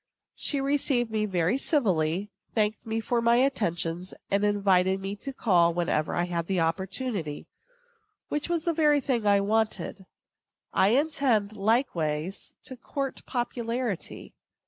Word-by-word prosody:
She 285 - -1
received 270 -4 +1
me 215 -1 0
very 180 +5 +1
civilly, 195 - +1 0.2
thanked 215 0 0
me 225 0 -1
for 235 +1 0
my 235 0 +4
attention, 175 -10 0 0.3
and 200 +1 +2
invited 195 -2 +3
me 195 +1 -4
to 275 - -6
call 175 -9 +3
whenever 170 -3 0
I 175 - +1
had 170 -1 -3
opportunity; 180 - -2 0.8
which 295 +3 -2
was 340 -1 -1
the 340 - +2
very 300 -2 +4
thing 245 -6 -1
I 200 -1 +5
wanted. 215 -2 -1 0.7
I 190 - +4
intend, 245 -5 +2
likewise, 195 - -1
to 260 - -7
court 270 +2 -4
popularity. 240 -4 -3
210 Hz, 130 wpm, -27 LUFS, 180-255 Hz, 0.8 s, I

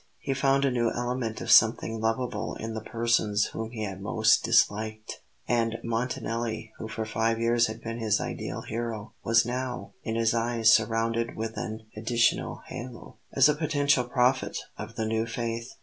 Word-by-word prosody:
He 135 - -2
found 135 +1 +2
a 135 - +2
new 120 -2 +1
element 120 -2 -3
of - - -1
something 110 0 +5
lovable 115 0 -1
in 115 0 -5
the 110 - -4
persons 110 -3 +1
whom 110 0 -4
he 115 -2 -5
had 95 -2 -5
most 110 +2 +3
disliked; 110 +1 +1 0.3
and 115 -1 +1
Montanelli, 115 -1 -2
who 110 - -5
for 110 0 -4
five 115 +1 0
years 115 +1 +3
had 110 +1 -7
been 115 +1 -4
his 110 -2 +1
ideal - - -4
hero, 115 -1 -5
was 115 +1 +4
now 125 +1 -4
in 110 - -3
his 115 -1 +2
eyes 115 -1 +3
surrounded 115 +1 +1
with 110 0 -4
an 110 0 -5
additional 115 +2 +1
halo, 120 0 -9 0.2
as 135 - +6
a 150 - +4
potential 145 -4 +1
prophet 125 +1 +1 0.2
of - - -8
the 110 - -1
new 110 +1 0
faith. 115 +1 -4
115 Hz, 170 wpm, -27 LUFS, 110-120 Hz, 0.3 s, as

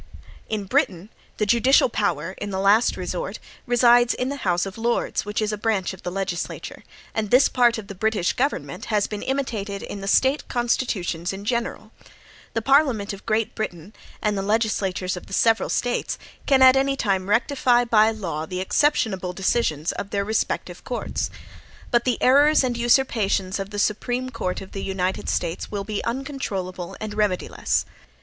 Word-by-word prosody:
In 215 -2 -2
Britain, 190 0 0 0.3
the 210 - +1
judicial 235 +6 +4
power, 185 - -1
in 205 - -4
the 190 -1 -3
last 205 +4 +4
resort, - - -4 0.3
resides 240 0 +5
in 250 - -2
the 280 - -4
House 175 -7 0
of 195 +3 -8
Lords, 235 -1 0
which 210 +1 -1
is 215 0 -1
a 210 - -4
branch 205 -4 0
of 190 - -12
the - - -4
legislature; 190 -2 -4 0.3
and 215 -2 -2
this 255 +5 +6
part 240 -2 +3
of 220 - -6
the 200 - -8
British 205 -2 0
government 245 - -2
has 210 -2 +1
been 210 -1 -5
imitated 220 -7 -3
in 200 - -6
the 195 - -5
State 265 +8 +2
constitutions 210 -8 -1
in 195 +1 -7
general. 235 +1 -2 0.6
The 225 - 0
Parliament 265 -7 +3
of 200 - -11
Great 220 +1 0
Britain, 190 -3 -5 0.3
and 210 -1 +1
the 195 - -1
legislatures 195 -3 0
of 180 - -9
the - - -10
several 225 +2 +3
States, 245 0 -1 0.3
can 265 -2 +5
at 260 0 +8
any 275 +1 +2
time 195 -4 0
rectify, 245 +2 +3
by 220 -2 +5
law, 170 -8 -4
the 180 +2 -4
exceptionable 190 -4 +1
decisions 180 -5 0
of 200 - -6
their 200 -1 -1
respective 220 +2 -2
courts. - - -3 0.6
But 240 -1 +2
the 250 - +1
errors 285 +3 +5
and 250 -2 0
usurpations 230 -6 +1
of 195 0 -4
the 205 - -7
Supreme 245 +5 -1
Court 205 -7 -3
of 190 - -10
the 195 - -5
United 190 -1 -2
States 170 -1 -2
will 200 -1 -3
be 210 0 -3
uncontrollable 220 -9 -4
and 215 -1 -5
remediless." 210 -4 0
215 Hz, 175 wpm, -23 LUFS, 195-240 Hz, 0.6 s, at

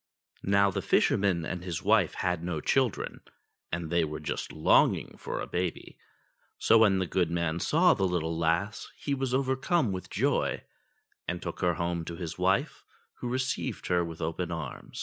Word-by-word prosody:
Now 100 0 +4
the - - -2
fisherman 95 -5 +2
and 90 +1 -4
his 90 -3 -4
wife - - +3
had 90 -2 -1
no 85 -3 -2
children, 130 - 0 0.5
and 85 -2 -3
they 85 -1 +3
were 75 -1 -4
just - - -4
longing 80 - +3
for - - -4
a - - -3
baby; 90 -1 -4 0.6
so 115 - +5
when 105 -4 +5
the 95 - 0
good 90 -1 0
man 85 -1 -1
saw 170 - +4
the 95 -2 +1
little 85 -2 -1
lass 85 +6 0
he 140 - -2
was 135 -2 -1
overcome 130 - +1
with 95 -1 -5
joy, - - 0 0.6
and 90 0 -2
took 85 -2 -6
her 90 -2 +2
home 85 0 -2
to 85 - -6
his 85 -2 -6
wife, - - +1 0.4
who 120 - -3
received 130 -1 -2
her 90 -1 +3
with 80 -1 -6
open 85 +2 -2
arms. 80 -6 -6
90 Hz, 175 wpm, -29 LUFS, 85-105 Hz, 0.6 s, so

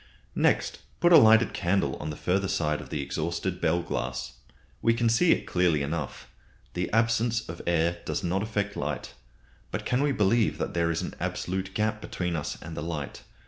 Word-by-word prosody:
Next, - - +1 0.2
put 175 0 +5
a - - +11
lighted 110 -3 +6
candle 85 -6 +1
on 75 - -5
the 75 - -4
further 95 +5 0
side 80 -6 0
of - - -11
the 75 - -2
exhausted 85 +5 -3
bell 85 +2 +2
glass. 60 -5 -3 0.5
We 115 0 +3
can 115 0 +2
see 145 +10 +4
it - - +2
clearly 85 -5 +2
enough. 75 0 -4 0.5
The 90 -1 -2
absence 115 +1 +1
of 85 +1 -7
air 85 0 +1
does - - -3
not 90 +3 0
affect 100 -1 -2
light. - - -4 0.6
But - - -4
can 125 +2 +1
we 145 0 +2
believe 110 -1 +2
that - - -3
there 85 -1 +1
is 85 - -1
an - - -5
absolute 95 +1 -3
gap 110 0 0
between 90 -4 -3
us 75 -3 -3
and 80 +1 -7
the - - -4
light? 80 -4 -5
90 Hz, 190 wpm, -27 LUFS, 80-110 Hz, 0.6 s, a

